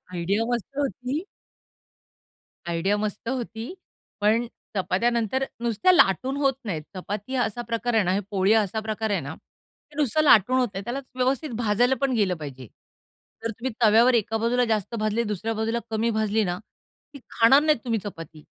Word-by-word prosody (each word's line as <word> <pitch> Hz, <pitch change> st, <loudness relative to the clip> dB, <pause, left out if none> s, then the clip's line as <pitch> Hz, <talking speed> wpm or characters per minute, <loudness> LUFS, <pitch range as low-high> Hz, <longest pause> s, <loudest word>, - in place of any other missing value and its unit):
Idea 190 Hz, +6 st, 0 dB
मस्त 240 Hz, -5 st, -2 dB
होती. 275 Hz, +2 st, -2 dB, 1.5 s
Idea 170 Hz, +5 st, +1 dB
मस्त 210 Hz, +2 st, -4 dB
होती, 240 Hz, -, -4 dB, 0.5 s
पण 225 Hz, +3 st, +2 dB, 0.3 s
चपात्या 195 Hz, +5 st, +1 dB
नंतर 235 Hz, +3 st, 0 dB, 0.2 s
नुसत्या 235 Hz, -, +3 dB
लाटून 260 Hz, -, +3 dB
होत 275 Hz, -2 st, +2 dB
नाहीत. 175 Hz, -8 st, -3 dB
चपाती 205 Hz, +7 st, -5 dB
हा 245 Hz, -, +2 dB
असा 240 Hz, +3 st, -4 dB
प्रकार 230 Hz, +1 st, -1 dB
आहे 220 Hz, -, +4 dB
ना, 180 Hz, -, +1 dB
हे 200 Hz, -, +1 dB
पोळी 195 Hz, +1 st, +2 dB
हा 220 Hz, -1 st, +5 dB
असा 210 Hz, +2 st, -3 dB
प्रकार 220 Hz, 0 st, -3 dB
आहे 195 Hz, -4 st, +1 dB
ना, 145 Hz, +3 st, -6 dB
ते 295 Hz, -, -27 dB
नुसतं 300 Hz, +1 st, +2 dB
लाटून 255 Hz, -2 st, +5 dB
होत 250 Hz, -, +2 dB
नाही. 195 Hz, +1 st, -5 dB
त्याला 245 Hz, +4 st, -3 dB
व्यवस्थित 260 Hz, +4 st, 0 dB
भाजायला 240 Hz, +3 st, +2 dB
पण 275 Hz, -2 st, +1 dB
गेलं 195 Hz, -4 st, +2 dB
पाहिजे. 135 Hz, -5 st, -8 dB, 0.8 s
जर 230 Hz, -, 0 dB
तुम्ही 235 Hz, +3 st, -5 dB
तव्यावर 230 Hz, +3 st, +6 dB
एका 225 Hz, -1 st, +1 dB
बाजूला 245 Hz, +2 st, +2 dB
जास्त 220 Hz, -1 st, -1 dB
भाजली, 215 Hz, +2 st, 0 dB
दुसऱ्या 215 Hz, +2 st, -3 dB
बाजूला 225 Hz, +2 st, -1 dB
कमी 225 Hz, +1 st, 0 dB
भाजली 220 Hz, -1 st, +1 dB
ना, 175 Hz, 0 st, -2 dB, 0.6 s
ती -, -, -8 dB
खाणार 230 Hz, +5 st, +6 dB
नाहीत 305 Hz, -3 st, +3 dB
तुम्ही. 230 Hz, -2 st, 0 dB
चपाती 165 Hz, -5 st, -9 dB
225 Hz, 175 wpm, -25 LUFS, 205-245 Hz, 1.5 s, तव्यावर